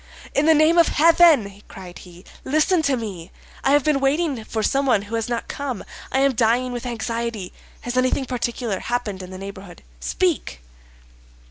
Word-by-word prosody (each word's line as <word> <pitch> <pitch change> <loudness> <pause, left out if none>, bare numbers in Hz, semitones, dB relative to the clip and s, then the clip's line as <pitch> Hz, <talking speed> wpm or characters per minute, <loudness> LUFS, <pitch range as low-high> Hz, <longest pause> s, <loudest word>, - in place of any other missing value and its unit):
"In 290 +3 +2
the 320 - +6
name 315 +3 +4
of 335 - +6
heaven!" 305 - +4
cried 180 -2 -11
he, 180 0 -15 0.2
"listen 310 +5 +2
to 280 -4 +1
me; 195 -7 -7 0.3
I - - +2
have 290 -1 +4
been 300 -2 +2
waiting 275 -2 0
for 220 -1 -3
someone 265 -5 +2
who 205 +2 -11
has 225 0 -2
not 235 -1 -3
come. 270 -6 -5 0.3
I 265 - +1
am 275 -1 +3
dying 240 +2 +1
with 245 0 -5
anxiety. 230 -4 -4 0.3
Has 245 0 -5
anything 255 +1 +1
particular 240 -4 -3
happened 235 -6 -3
in 185 - -9
the 185 - -8
neighborhood? 195 - -10 0.2
Speak!" - - -2
240 Hz, 170 wpm, -22 LUFS, 200-275 Hz, 0.3 s, the